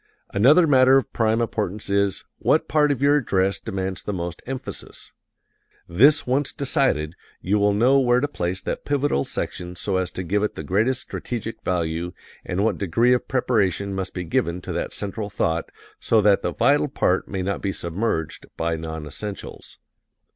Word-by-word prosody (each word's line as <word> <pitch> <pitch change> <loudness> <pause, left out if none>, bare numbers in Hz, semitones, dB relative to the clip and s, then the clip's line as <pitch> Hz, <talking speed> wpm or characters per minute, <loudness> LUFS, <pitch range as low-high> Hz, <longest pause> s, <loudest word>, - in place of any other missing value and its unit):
Another 140 - +6
matter 130 -2 +6
of 135 - -2
prime 115 0 +1
importance 105 -3 -2
is, 100 -1 0
what - - +2
part 150 -1 +3
of 140 -1 -2
your 145 +1 +5
address 100 -7 +1
demands 95 -4 -4
the - - -4
most 85 -3 -4
emphasis. 130 0 -7 0.8
This 140 - +5
once 135 +3 0
decided, 130 - 0 0.3
you 100 +3 0
will 100 0 +3
know 130 +6 +4
where 125 -2 +3
to 145 - 0
place 90 -9 -3
that - - -4
pivotal 145 - 0
section 90 0 -4
so 95 +1 -1
as 95 -1 -1
to 95 - -4
give 100 +4 0
it 105 - -1
the 80 - -6
greatest 110 - +1
strategic 115 -2 -5
value, 85 0 -2 0.3
and 95 +3 -1
what 110 -5 0
degree 115 +7 +3
of 125 - -1
preparation 100 -6 0
must 95 -1 -4
be 90 - -3
given 85 +1 -1
to - - -5
that - - -3
central 105 +1 -4
thought 80 -4 -1 0.3
so 115 - +3
that 105 -1 +4
the - - -1
vital 145 +1 +3
part 95 -9 0
may 95 -2 -3
not 100 +1 -2
be 100 - -1
submerged 85 -2 -3
by 80 0 0
non 80 -1 -6
essentials. 100 +7 -7
100 Hz, 175 wpm, -23 LUFS, 90-125 Hz, 0.8 s, Another